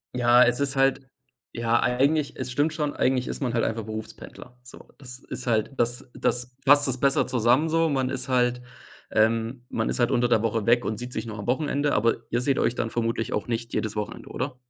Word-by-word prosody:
Ja, 120 Hz, 0 st, +5 dB
es 125 Hz, +2 st, +1 dB
ist 140 Hz, -1 st, -1 dB
halt 135 Hz, 0 st, +1 dB, 0.5 s
ja, 115 Hz, 0 st, +1 dB
eigentlich, 140 Hz, +4 st, +1 dB
es 125 Hz, -, -5 dB
stimmt 150 Hz, +4 st, +1 dB
schon. 150 Hz, -2 st, -2 dB
Eigentlich 130 Hz, -1 st, +1 dB
ist -, -, -5 dB
man 125 Hz, -3 st, -1 dB
halt 115 Hz, -, +1 dB
einfach 115 Hz, -1 st, -2 dB
Berufspendler, 110 Hz, +3 st, -9 dB
so. 125 Hz, -, -14 dB
Das 125 Hz, -2 st, -9 dB
ist 130 Hz, -, -8 dB
halt 110 Hz, +2 st, +1 dB
das 120 Hz, +2 st, -1 dB
das 125 Hz, +1 st, -1 dB
fasst 145 Hz, 0 st, +6 dB
das 130 Hz, -1 st, -1 dB
besser 140 Hz, -1 st, +2 dB
zusammen 125 Hz, +5 st, +2 dB
so. 165 Hz, 0 st, +2 dB
Man 130 Hz, -2 st, 0 dB
ist -, -, -3 dB
halt, 125 Hz, -1 st, +1 dB, 0.5 s
ähm 115 Hz, +3 st, +1 dB
man 110 Hz, -, -1 dB
ist -, -, -2 dB
halt 120 Hz, +1 st, +3 dB
unter 120 Hz, -1 st, +2 dB
der 115 Hz, -3 st, +3 dB
Woche 115 Hz, -1 st, -1 dB
weg 120 Hz, +1 st, +4 dB
und 110 Hz, -, -2 dB
sieht 125 Hz, +1 st, -7 dB
sich -, -, -4 dB
nur 110 Hz, 0 st, -6 dB
am 100 Hz, -, -7 dB
Wochenende, 145 Hz, +2 st, 0 dB
aber 115 Hz, +2 st, +2 dB
ihr 120 Hz, +1 st, 0 dB
seht 135 Hz, +1 st, +1 dB
euch 120 Hz, -, +1 dB
dann 115 Hz, -, -2 dB
vermutlich 115 Hz, -1 st, -2 dB
auch 105 Hz, -, -2 dB
nicht 115 Hz, 0 st, -4 dB
jedes 110 Hz, -1 st, -2 dB
Wochenende, 105 Hz, -1 st, -5 dB
oder? 130 Hz, +1 st, -4 dB
125 Hz, 220 wpm, -25 LUFS, 115-135 Hz, 0.5 s, fasst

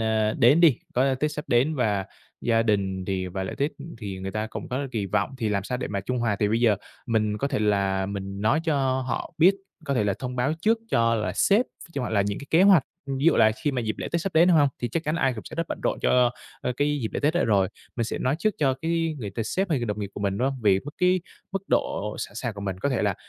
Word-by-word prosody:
ơ, 110 Hz, -1 st, +1 dB
đến 135 Hz, +8 st, +6 dB
đi, 155 Hz, -8 st, +6 dB, 0.2 s
có 130 Hz, +2 st, +3 dB
Tết 150 Hz, +4 st, -1 dB
sắp 150 Hz, -, -5 dB
đến 135 Hz, +5 st, +3 dB
và 105 Hz, -7 st, 0 dB, 0.3 s
gia 115 Hz, -1 st, +2 dB
đình 95 Hz, -4 st, 0 dB
thì 95 Hz, -1 st, -2 dB
và 95 Hz, +1 st, -4 dB
lễ -, -, -5 dB
Tết, 140 Hz, +2 st, +1 dB
ừm, 155 Hz, +3 st, -9 dB
thì 100 Hz, -3 st, -6 dB
người 95 Hz, +1 st, -4 dB
ta 110 Hz, +1 st, -2 dB
cũng 110 Hz, -, -7 dB
có 135 Hz, +3 st, -2 dB
kỳ 105 Hz, -4 st, -1 dB
vọng 130 Hz, +7 st, -1 dB
thì 110 Hz, -, 0 dB
làm 100 Hz, -2 st, -1 dB
sao 125 Hz, +3 st, -3 dB
để -, -, -3 dB
mà 100 Hz, -1 st, -2 dB
trung 125 Hz, +6 st, -2 dB
hòa. 115 Hz, -4 st, 0 dB
Thì 105 Hz, -, +3 dB
bây 115 Hz, +2 st, +1 dB
giờ 110 Hz, -4 st, +4 dB, 0.3 s
mình 110 Hz, -2 st, 0 dB
có 140 Hz, -, -1 dB
thể 135 Hz, -, -1 dB
là 100 Hz, -2 st, +1 dB
mình 100 Hz, 0 st, -5 dB
nói 115 Hz, +9 st, +2 dB
cho 135 Hz, -5 st, +1 dB
họ -, -, -3 dB
biết, 180 Hz, +5 st, +6 dB, 0.3 s
có 140 Hz, -, -1 dB
thể 110 Hz, -, +1 dB
là 100 Hz, -1 st, +1 dB
thông 125 Hz, -1 st, -5 dB
báo 125 Hz, +4 st, +1 dB
trước 225 Hz, +5 st, +3 dB
cho 115 Hz, -1 st, +3 dB
là 105 Hz, -5 st, -1 dB
sếp, 205 Hz, -, +3 dB, 0.3 s
cho 140 Hz, -, -2 dB
họ 120 Hz, -, -3 dB
là 105 Hz, -, +2 dB
những 100 Hz, 0 st, -2 dB
cái 140 Hz, -, -9 dB
kế 165 Hz, +4 st, +5 dB
hoạch, 195 Hz, -7 st, +7 dB, 0.2 s
ưm, 135 Hz, -1 st, -3 dB
ví 140 Hz, -, -2 dB
dụ 170 Hz, -, +5 dB
là 110 Hz, -1 st, +6 dB
khi 145 Hz, -, +2 dB
mà 125 Hz, -, -1 dB
dịp 110 Hz, -1 st, -2 dB
lễ -, -, -4 dB
Tết 170 Hz, -, +1 dB
sắp 195 Hz, +2 st, -3 dB
đến, 165 Hz, +3 st, +6 dB
đúng 175 Hz, -, +5 dB
hông? 145 Hz, -2 st, +5 dB
Thì 120 Hz, -, 0 dB
chắc 160 Hz, +8 st, -2 dB
chắn 155 Hz, +1 st, 0 dB
ai 135 Hz, -5 st, +2 dB
cũng 110 Hz, -, -8 dB
sẽ -, -, -9 dB
rất 165 Hz, -1 st, -2 dB
bận -, -, -4 dB
rộn -, -, 0 dB
cho, 125 Hz, -1 st, +4 dB, 0.3 s
ơ, 125 Hz, -, -1 dB
cái 145 Hz, +1 st, +1 dB
dịp 110 Hz, -, -1 dB
lễ -, -, -2 dB
Tết 150 Hz, +3 st, +2 dB
đó 175 Hz, -, +2 dB
rồi, 100 Hz, -4 st, +3 dB, 0.3 s
mình 115 Hz, -, 0 dB
sẽ -, -, -3 dB
nói 130 Hz, +4 st, 0 dB
trước 215 Hz, +3 st, +1 dB
cho 135 Hz, -3 st, +2 dB
cái 165 Hz, -1 st, 0 dB
người 105 Hz, -5 st, -5 dB
t -, -, -24 dB
sếp 190 Hz, -, -1 dB
hay 150 Hz, -, +2 dB
đồng 105 Hz, -2 st, -3 dB
nghiệp 100 Hz, -, -3 dB
của -, -, -6 dB
mình, 100 Hz, -1 st, -1 dB
đúng 130 Hz, -, +2 dB
hông? 135 Hz, -2 st, -5 dB
Vì 95 Hz, -2 st, +4 dB
mức 145 Hz, -, -8 dB
cái 180 Hz, 0 st, +3 dB, 0.3 s
mức 195 Hz, -1 st, -2 dB
độ 105 Hz, +1 st, 0 dB
sẵn -, -, -5 dB
sàng 115 Hz, 0 st, -3 dB
của 100 Hz, -, -8 dB
mình, 95 Hz, -2 st, -3 dB
có 140 Hz, -, 0 dB
thể 130 Hz, -6 st, 0 dB
là 100 Hz, -2 st, +1 dB
120 Hz, 295 wpm, -25 LUFS, 105-145 Hz, 0.3 s, hoạch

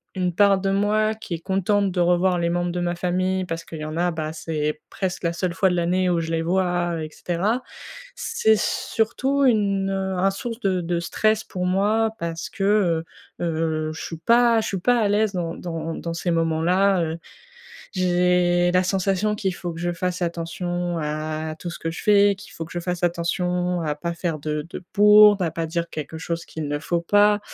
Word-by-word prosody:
une 180 Hz, -2 st, 0 dB
part 200 Hz, 0 st, +5 dB
de 195 Hz, 0 st, 0 dB
moi 210 Hz, +2 st, +2 dB
qui 215 Hz, -5 st, -6 dB
est 165 Hz, -, -7 dB
contente 195 Hz, +2 st, +1 dB
de 180 Hz, -, -2 dB
revoir 175 Hz, +1 st, +3 dB
les 170 Hz, -, 0 dB
membres 175 Hz, 0 st, 0 dB
de 175 Hz, -, -3 dB
ma 175 Hz, 0 st, -1 dB
famille 185 Hz, +1 st, 0 dB
parce 165 Hz, -1 st, -4 dB
qu'il 165 Hz, -, -9 dB
y 155 Hz, -, -4 dB
en 155 Hz, 0 st, -5 dB
a, 175 Hz, +1 st, +1 dB
bah, 155 Hz, -1 st, -4 dB
c'est 150 Hz, -1 st, -3 dB
presque 185 Hz, -2 st, -3 dB
la 170 Hz, 0 st, 0 dB
seule 175 Hz, 0 st, -2 dB
fois 190 Hz, +3 st, +2 dB
de 180 Hz, -, 0 dB
l'année 180 Hz, +2 st, +1 dB
où 175 Hz, -1 st, +2 dB
je 165 Hz, 0 st, -3 dB
les 165 Hz, 0 st, 0 dB
vois 175 Hz, -1 st, 0 dB
et 155 Hz, -, -6 dB
cetera, 195 Hz, +10 st, -1 dB, 0.5 s
c'est 220 Hz, 0 st, +2 dB
surtout 270 Hz, +5 st, 0 dB
une, 200 Hz, -5 st, +2 dB
heu, 190 Hz, -1 st, -2 dB
un 195 Hz, +2 st, +2 dB
source 230 Hz, +4 st, -5 dB
de 190 Hz, -3 st, +1 dB
de 170 Hz, 0 st, -1 dB
stress 215 Hz, +5 st, +1 dB
pour 180 Hz, -1 st, -4 dB
moi 210 Hz, +4 st, +2 dB
parce 165 Hz, -1 st, -4 dB
que, 195 Hz, -, -5 dB, 0.8 s
heu, -, -, 0 dB
heu, 160 Hz, -1 st, -1 dB
je 160 Hz, -, -8 dB
suis 165 Hz, -, -6 dB
pas 235 Hz, +5 st, +4 dB
je -, -, -3 dB
suis 195 Hz, -, -2 dB
pas 245 Hz, +6 st, +3 dB
à 215 Hz, -, +2 dB
l'aise 210 Hz, 0 st, +2 dB
dans 170 Hz, -2 st, -2 dB
dans 165 Hz, -2 st, -5 dB
dans 170 Hz, 0 st, -5 dB
ces 175 Hz, +1 st, -1 dB
moments-là, 170 Hz, +3 st, +2 dB
heu. 160 Hz, 0 st, -3 dB, 0.8 s
J'ai 180 Hz, -1 st, +2 dB
la 180 Hz, 0 st, +4 dB
sensation 195 Hz, +2 st, 0 dB
qu'il 195 Hz, -3 st, -2 dB
faut 175 Hz, -1 st, -5 dB
que 165 Hz, -, -8 dB
je 175 Hz, 0 st, -1 dB
fasse 180 Hz, +1 st, -3 dB
attention 175 Hz, 0 st, -2 dB
à 155 Hz, +1 st, -3 dB
tout 175 Hz, -, -5 dB
ce -, -, -8 dB
que 165 Hz, -, -3 dB
je 165 Hz, -, -7 dB
fais, 205 Hz, -1 st, +5 dB
qu'il 200 Hz, -, -13 dB
faut 165 Hz, -, -6 dB
que -, -, -12 dB
je 175 Hz, -, -3 dB
fasse 175 Hz, 0 st, -3 dB
attention 175 Hz, +1 st, 0 dB
à 155 Hz, -2 st, -1 dB
pas 170 Hz, +3 st, -4 dB
faire 170 Hz, -2 st, -3 dB
de 150 Hz, +1 st, -3 dB
de 175 Hz, -, -8 dB
bourde, 210 Hz, 0 st, +7 dB
à 170 Hz, -, 0 dB
pas 165 Hz, +1 st, -3 dB
dire 170 Hz, +1 st, -2 dB
quelque 155 Hz, +1 st, -6 dB
chose 170 Hz, 0 st, -4 dB
qu'il 155 Hz, -2 st, -6 dB
ne 145 Hz, 0 st, -1 dB
faut 170 Hz, +2 st, -1 dB
pas 205 Hz, +4 st, +4 dB
175 Hz, 215 wpm, -23 LUFS, 165-195 Hz, 0.8 s, bourde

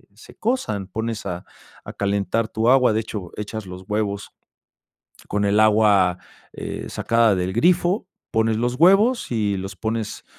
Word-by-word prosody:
se 110 Hz, -, -16 dB
cosan, 110 Hz, -, -2 dB
pones 110 Hz, +2 st, -4 dB
a 90 Hz, -2 st, -5 dB, 0.4 s
a -, -, -8 dB
calentar 100 Hz, +2 st, -1 dB
tu 110 Hz, +2 st, +1 dB
agua. 125 Hz, -2 st, +5 dB
De 110 Hz, -, +1 dB
hecho, 105 Hz, -5 st, -7 dB
echas 105 Hz, 0 st, -5 dB
los 90 Hz, 0 st, -9 dB
huevos 105 Hz, -1 st, -2 dB, 1.0 s
con 105 Hz, 0 st, 0 dB
el 100 Hz, +1 st, +3 dB
agua, 105 Hz, -4 st, +4 dB, 0.3 s
eh, -, -, -6 dB
sacada 115 Hz, -2 st, +2 dB
del 90 Hz, 0 st, -2 dB
grifo, 175 Hz, -, +2 dB, 0.2 s
pones 110 Hz, -1 st, +1 dB
los 120 Hz, +2 st, 0 dB
huevos 195 Hz, -, +4 dB
y 105 Hz, -4 st, 0 dB
los 95 Hz, +1 st, -6 dB
pones, 110 Hz, 0 st, -4 dB
110 Hz, 150 wpm, -22 LUFS, 100-115 Hz, 1.0 s, agua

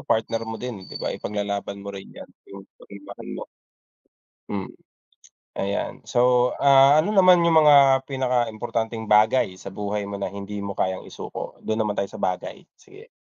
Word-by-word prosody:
partner 115 Hz, 0 st, -1 dB
mo 115 Hz, -, -4 dB
din, 115 Hz, -6 st, -7 dB
di -, -, -8 dB
ba, -, -, -3 dB
ipaglalaban 100 Hz, -1 st, -4 dB
mo 100 Hz, -, -6 dB
rin 100 Hz, -1 st, -9 dB
'yan, -, -, -10 dB, 0.2 s
'yung 100 Hz, 0 st, -11 dB, 0.2 s
pagmamahal 100 Hz, 0 st, -11 dB
mo. -, -, -6 dB, 1.0 s
Mm. 100 Hz, -2 st, -5 dB, 0.8 s
Ayan, 100 Hz, +1 st, -2 dB
so, 125 Hz, 0 st, +3 dB
ah, 140 Hz, +1 st, +6 dB
ano 205 Hz, +7 st, 0 dB
naman 185 Hz, -2 st, +7 dB
'yung 170 Hz, -1 st, +3 dB
mga 140 Hz, -2 st, +6 dB
pinakaimportanteng 120 Hz, -3 st, -2 dB
bagay 105 Hz, -1 st, +3 dB
sa 95 Hz, +1 st, -10 dB
buhay 105 Hz, +1 st, -3 dB
mo 100 Hz, 0 st, -6 dB
na 100 Hz, -, -2 dB
hindi 100 Hz, +2 st, -7 dB
mo 100 Hz, -1 st, -5 dB
kayang 95 Hz, 0 st, -2 dB
isuko? -, -, -8 dB
Do'n 110 Hz, +1 st, -2 dB
naman 105 Hz, -2 st, -1 dB
tayo 100 Hz, -, -1 dB
sa -, -, -9 dB
bagay, 95 Hz, -, -4 dB
sige. 405 Hz, +4 st, -17 dB
110 Hz, 165 wpm, -23 LUFS, 100-135 Hz, 1.0 s, naman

